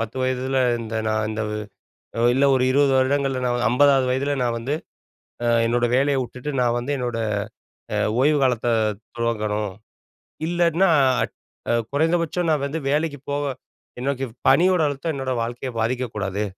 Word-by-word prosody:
10 115 +2 -4
வயதுல 130 +1 0 0.2
இந்த 115 -1 -5
நான் 110 0 0
இந்த 110 0 -3 0.9
இல்ல 135 +2 +3
ஒரு 130 - +2
20 140 0 +3
வருடங்கள்ல 135 0 +1
நான் 120 0 0
50வது 135 +1 +4
வயதுல 140 +2 0
நான் 120 -1 0
வந்து 135 +6 -2 0.7
ஆ, - - +1 0.2
என்னோட 120 +1 +1
வேலைய 140 +2 +2
விட்டுட்டு 125 +3 -6
நான் 120 -1 +2
வந்து, 120 +4 -3
என்னோட, 120 -3 -3 0.8
அ, - - 0 0.2
ஓய்வு 150 +2 +4
காலத்த 120 -2 +1 0.5
துவங்கணும். 105 -3 -1 0.8
இல்லாட்ன்னா 175 +2 +2 0.3
அட் - - -5 0.6
குறைந்தபட்சம் 170 +3 +1
நான் 150 -3 +1
வந்து 155 +3 -3
வேலைக்குப் 145 -1 -1
போவ 145 +1 -1 0.6
எனக்குப் 135 -2 -2
பணியோட 180 0 +5
அழுத்தம் 145 +3 -3
என்னோட 135 -1 -3
வாழ்க்கையப் 120 +1 -4
பாதிக்கக் 120 +1 -1
கூடாது 100 0 -2
130 Hz, 140 wpm, -23 LUFS, 120-145 Hz, 0.9 s, பணியோட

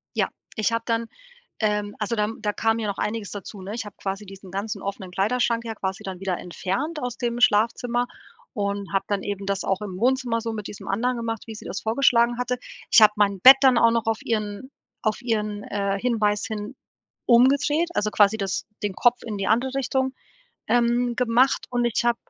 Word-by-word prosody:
Ja, - - +1 0.3
ich 220 +1 +1
habe 230 0 -1
dann 230 0 0 0.5
ähm, 210 -1 0
also 210 +2 -1
da, 210 - +2
hm 220 +2 -7
da 210 - 0
kam 225 0 +1
ja 215 - -2
noch 200 - -3
einiges 215 -1 -3
dazu, 200 0 -8
ne? 200 +3 -6
Ich 230 -2 -4
habe 205 - -10
quasi 195 +1 -4
diesen 195 -1 -12
ganzen 200 +2 -4
offenen 195 -2 -5
Kleiderschrank 230 +4 +1
ja 225 - -3
quasi 190 -1 -4
dann 185 -2 -6
wieder 190 -2 -2
entfernt 265 - -3
aus 245 -1 -3
dem 240 -1 -2
Schlafzimmer 240 +3 +2 0.5
und 200 -1 -3
habe 195 - +1
dann 200 -2 -1
eben 200 -1 -4
das 195 -1 -1
auch 195 +1 -1
im 190 -3 -6
Wohnzimmer 245 -2 +1
so 230 - -3
mit 210 -2 -5
diesem 205 - -10
anderen 245 +6 0
gemacht, 225 -1 -3
wie 220 - -7
sie - - -10
das - - -4
vorgeschlagen 235 0 +3
hatte. 250 0 -1 0.3
Ich - - +8
habe 215 -1 +7
mein 200 -2 +2
Bett 265 +1 +11
dann 260 -3 +5
auch 230 -1 +5
noch 230 -1 0
auf 225 -1 +1
ihren 215 +4 -3 0.3
auf 215 +2 -1
ihren, 210 -3 -2
äh, 200 -1 -1
Hinweis 215 -4 +1
hin 215 +3 -5 0.5
umgedreht, 280 +7 +4
also 215 -7 0
quasi 210 +1 +4
das 195 -2 -2 0.2
den 205 -2 -1
Kopf 245 +4 +3
in 215 -3 -4
die 195 - -2
andere 255 +4 +1
Richtung, 265 0 0 0.5
ähm, 240 0 +2
gemacht 250 +2 +2
und 245 -1 0
ich 235 0 0
habe 240 - +3
220 Hz, 205 wpm, -24 LUFS, 205-240 Hz, 0.5 s, Bett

